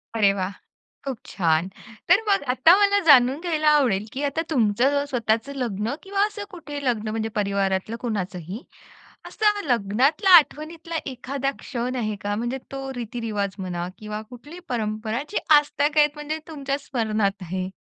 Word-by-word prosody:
अरे, 205 Hz, -3 st, +4 dB
वा! 190 Hz, -2 st, -2 dB, 0.6 s
खूप 265 Hz, -5 st, -4 dB
छान. 165 Hz, -1 st, +1 dB, 0.4 s
तर 350 Hz, +4 st, +6 dB
मग 395 Hz, -5 st, +3 dB
आता 320 Hz, +8 st, +6 dB
मला, 405 Hz, 0 st, +4 dB
जाणून 265 Hz, 0 st, +6 dB
घ्यायला 315 Hz, -3 st, 0 dB
आवडेल, 250 Hz, -10 st, +3 dB
की 270 Hz, -, -4 dB
आता, 285 Hz, +3 st, 0 dB
तुमचं 260 Hz, +2 st, +2 dB
स्वतःचं 230 Hz, +2 st, 0 dB
लग्न 230 Hz, -3 st, -2 dB
किंवा 395 Hz, 0 st, -3 dB
असं, 415 Hz, -1 st, -7 dB
कुठेही 290 Hz, -5 st, -7 dB
लग्न 225 Hz, -4 st, 0 dB
म्हणजे 220 Hz, 0 st, -2 dB
परिवारातलं, 200 Hz, +2 st, -1 dB
कुणाचंही 195 Hz, -, -4 dB, 0.6 s
,असं 420 Hz, -1 st, +1 dB
लग्नातला 250 Hz, -, +2 dB
आठवणीतला 325 Hz, +1 st, 0 dB
एखादा 270 Hz, +1 st, -3 dB
क्षण 250 Hz, 0 st, -3 dB
आहे 215 Hz, -3 st, -2 dB
का? 205 Hz, 0 st, -1 dB
म्हणजे 240 Hz, +4 st, -2 dB
तो, 270 Hz, 0 st, -5 dB
रीतिरिवाज 220 Hz, -4 st, -3 dB
म्हणा 180 Hz, -2 st, -4 dB
किंवा 215 Hz, -1 st, -6 dB
कुठलीही, 290 Hz, +8 st, -11 dB
परंपरा 220 Hz, 0 st, -2 dB
जी 420 Hz, -, -7 dB, 0.2 s
आजतागायत 295 Hz, 0 st, +3 dB
आहेत, 295 Hz, 0 st, +6 dB
म्हणजे 300 Hz, +1 st, -4 dB
तुमच्या 280 Hz, -3 st, -3 dB
स्मरणात 215 Hz, -7 st, -1 dB
आहे. 185 Hz, +1 st, -4 dB
245 Hz, 150 wpm, -24 LUFS, 210-295 Hz, 0.6 s, तर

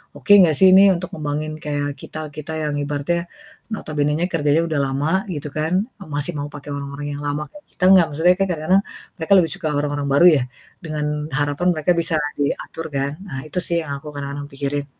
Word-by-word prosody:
oke -, -, -3 dB
gak 155 Hz, -3 st, +1 dB
sih 190 Hz, -, +7 dB
ini 190 Hz, +1 st, +8 dB
untuk 175 Hz, +1 st, -5 dB
ngembangin 150 Hz, 0 st, -3 dB
kayak 145 Hz, -1 st, -2 dB
kita-kita 155 Hz, 0 st, -7 dB
yang 150 Hz, -1 st, -1 dB
ibaratnya 145 Hz, +4 st, -1 dB, 0.5 s
notabenenya 150 Hz, -1 st, -1 dB
kerjanya 150 Hz, -1 st, +2 dB
udah 155 Hz, -3 st, -1 dB
lama 135 Hz, +3 st, -1 dB, 0.3 s
gitu 145 Hz, 0 st, -5 dB
kan, 160 Hz, +3 st, -1 dB, 0.3 s
eee, 195 Hz, -, -10 dB
masih 145 Hz, +4 st, 0 dB
mau 145 Hz, -, -3 dB
pake 145 Hz, 0 st, -9 dB
orang-orang 140 Hz, +1 st, -6 dB
yang -, -, -7 dB
lama 145 Hz, +1 st, -2 dB
kayak 295 Hz, 0 st, -15 dB
kita 180 Hz, -, -6 dB
enggak. 185 Hz, -3 st, +7 dB
Maksudnya 175 Hz, +4 st, +4 dB
kan 195 Hz, -, +3 dB
kadang-kadang 175 Hz, +5 st, +2 dB, 0.4 s
mereka 165 Hz, +4 st, +1 dB
lebih 165 Hz, -3 st, +3 dB
suka 155 Hz, -, -4 dB
orang-orang 145 Hz, -1 st, -1 dB
baru 175 Hz, +5 st, +5 dB
ya 125 Hz, -, 0 dB, 0.4 s
dengan 155 Hz, -2 st, -3 dB, 0.3 s
harapan 145 Hz, +5 st, 0 dB
mereka 155 Hz, +3 st, +1 dB
bisa 160 Hz, -, 0 dB, 0.2 s
diatur 160 Hz, +3 st, -3 dB
kan. 140 Hz, +1 st, 0 dB, 0.2 s
Nah 135 Hz, -6 st, -5 dB
itu 155 Hz, -, -8 dB
sih 170 Hz, -, 0 dB
yang 150 Hz, -3 st, -7 dB
aku 150 Hz, -, -13 dB
kadang-kadang 145 Hz, 0 st, -5 dB
pikirin. 140 Hz, +1 st, -2 dB
150 Hz, 190 wpm, -21 LUFS, 145-165 Hz, 0.5 s, ini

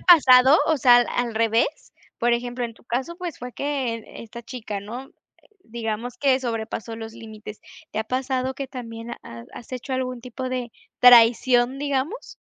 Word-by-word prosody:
pasado? 270 Hz, -5 st, +7 dB
O 320 Hz, -, +3 dB
sea, 245 Hz, -2 st, +6 dB
¿al 245 Hz, -, +2 dB
al 240 Hz, -2 st, -2 dB
revés? 225 Hz, +6 st, 0 dB, 0.3 s
Por 240 Hz, +1 st, +2 dB
ejemplo, 245 Hz, +1 st, -2 dB
en 230 Hz, -1 st, -6 dB
tu -, -, -23 dB
caso, 260 Hz, +9 st, -3 dB
pues 350 Hz, -3 st, -6 dB
fue 250 Hz, 0 st, -7 dB
que 260 Hz, -6 st, -3 dB, 0.2 s
esta 235 Hz, +1 st, -10 dB
chica, 225 Hz, -4 st, -6 dB
¿no?, 240 Hz, +7 st, -8 dB, 0.6 s
digamos 230 Hz, +1 st, -4 dB
que 270 Hz, -2 st, +3 dB
sobrepasó 225 Hz, -2 st, -4 dB
los 225 Hz, 0 st, -8 dB
límites. 220 Hz, -2 st, -10 dB, 0.3 s
¿Te -, -, -4 dB
ha 220 Hz, -, -1 dB
pasado 260 Hz, +1 st, -2 dB
que 275 Hz, +1 st, -5 dB
también 230 Hz, -2 st, -8 dB
has 115 Hz, 0 st, -10 dB
has 245 Hz, -, -11 dB
hecho 255 Hz, +2 st, -5 dB
algún 255 Hz, -1 st, -2 dB
tipo 255 Hz, +2 st, -6 dB
de 250 Hz, -2 st, -3 dB, 0.3 s
traición, 245 Hz, +1 st, +6 dB
digamos? 285 Hz, -, -3 dB
245 Hz, 170 wpm, -23 LUFS, 230-260 Hz, 0.6 s, pasado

